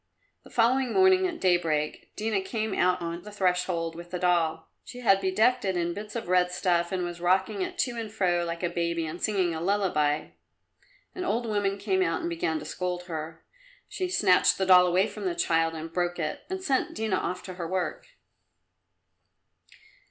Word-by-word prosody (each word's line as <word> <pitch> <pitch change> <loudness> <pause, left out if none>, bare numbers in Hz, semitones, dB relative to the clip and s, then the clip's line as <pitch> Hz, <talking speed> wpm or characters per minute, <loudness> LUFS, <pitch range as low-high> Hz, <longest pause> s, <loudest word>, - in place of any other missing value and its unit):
The - - -15
following 245 +1 +2
morning, 375 0 +5
at 350 -2 -6
daybreak, 165 -5 0
Dina 210 -2 -1
came 220 +1 -3
out 180 0 +2
on 170 +1 -4
the 210 - -11
threshold 180 -4 0
with 170 +1 -9
the 180 - -3
doll. 170 -3 +1 0.2
She 250 - -10
had 195 -5 +4
bedecked 220 +7 +2
it 190 -2 0
in 170 0 -1
bits 210 +3 -8
of 230 -4 -4
red 180 0 +3
stuff, 175 -1 0
and 185 -1 -1
was 175 0 -5
rocking 185 - +1
it 370 -1 -4
to 250 -7 0
and 220 -2 -5
fro 180 -5 +1
like 170 +1 -4
a 175 - +1
baby 170 -1 -1
and 160 +3 -6
singing 190 -5 +1
a 160 - -4
lullaby. 170 -6 +1 0.8
An 365 - -5
old 240 -9 -1
woman 205 -3 0
came 195 -2 0
out 165 -2 0
and 170 - -3
began 165 -1 -1
to - - -7
scold 180 -1 -3
her. 160 -2 -7 0.4
She 370 -1 -3
snatched 190 - +4
the 190 - 0
doll 180 -1 +7
away 180 +2 +3
from 210 -2 -7
the 180 -2 -1
child 165 -1 +1
and 160 +1 -7
broke 175 0 -1
it, 155 -3 -4
and 375 0 -4
sent 270 -7 0
Dina 215 -4 0
off 180 0 -3
to 185 - -7
her 175 -2 -5
work. 180 -2 -3
180 Hz, 195 wpm, -27 LUFS, 170-210 Hz, 0.8 s, doll